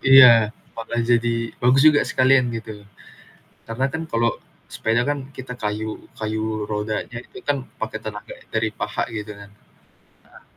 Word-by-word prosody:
Iya, 125 -5 +8 0.3
bakal 115 +1 -4
jadi 115 -1 +1
bagus 130 +3 +4
juga 155 -1 +7
sekalian 130 -1 +4
gitu. 110 -1 -7 0.9
Karena 115 +4 -2
kan 160 - -3
kalau 115 -4 +1 0.4
sepeda 115 +2 0
kan 145 - -1 0.2
kita 130 -1 -7
kayuh 110 0 -3 0.2
kayuh 110 0 -2
rodanya 105 +3 -3
itu - - -13
kan 145 - +3 0.2
pake - - -3
tenaga 105 -1 -7
yang - - -22
dari 110 0 +1
paha 105 0 -2
gitu, 105 -1 -6
kan. 100 0 -13 0.8
Heeh. - - -17
115 Hz, 150 wpm, -22 LUFS, 110-125 Hz, 0.9 s, Iya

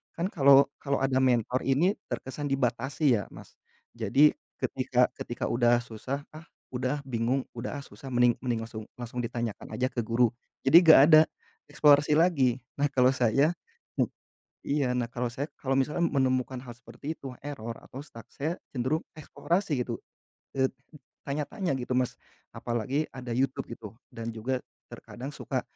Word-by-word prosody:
kan 170 +2 -1
kalau 140 -2 +6
kalau 140 -1 -1
ada 135 -1 +2
mentor 125 0 +2
ini 165 +10 +3 0.2
terkesan 140 +3 -4
dibatasi 130 +1 +1
ya - - -4
Mas, - - -13 0.4
jadi 120 +7 +4 0.3
ketika - - +2
ketika - - -4
udah 120 0 +4
susah, 130 +5 -5
ah, 160 - -10 0.3
udah, 130 +3 -1
ah, - - -9
bingung 125 +2 0
udah, 115 +4 -4
ah, - - -9
susah 135 - -12
mending 120 -1 +4
mending 120 -3 -1
langsung 110 -1 -7
langsung 120 +1 -5
ditanyakan 115 -2 -4
aja 130 - +1
ke 120 - -3
guru 115 0 +3 0.3
jadi 145 +5 +8
gak 160 -4 +9
ada, 155 - +10 0.5
eksplorasi 150 0 +5
lagi 135 -8 +3 0.2
nah 145 - +3
kalau 130 -1 +4
saya 135 +4 +3 0.5
mu - - +4 0.6
iya 140 -3 +1
nah 120 - 0
kalau 120 +1 -2
saya 135 +5 -4
kalau 135 0 0
misalnya 150 +5 0
menemukan 130 -2 0
hal 120 - -9
seperti 120 +6 -7
itu 135 - -7 0.2
error 115 -6 -5
atau 130 - -10
stuck 115 -6 -13
saya 160 +5 -2 0.2
cenderung 130 +5 0
eksplorasi 160 -1 -1
gitu, 115 - -5 0.6
eee, 130 0 +3 0.6
tanya-tanya 150 +6 -2
gitu 130 0 -4
Mas, 125 -1 0 0.4
apalagi 120 +6 -1
ada 125 -2 -6
YouTube 135 +1 -1
gitu 110 -3 -8 0.2
dan 115 0 -5
juga 125 +4 -2 0.3
terkadang 125 +3 -9
suka - - -2
130 Hz, 160 wpm, -28 LUFS, 120-145 Hz, 0.6 s, ada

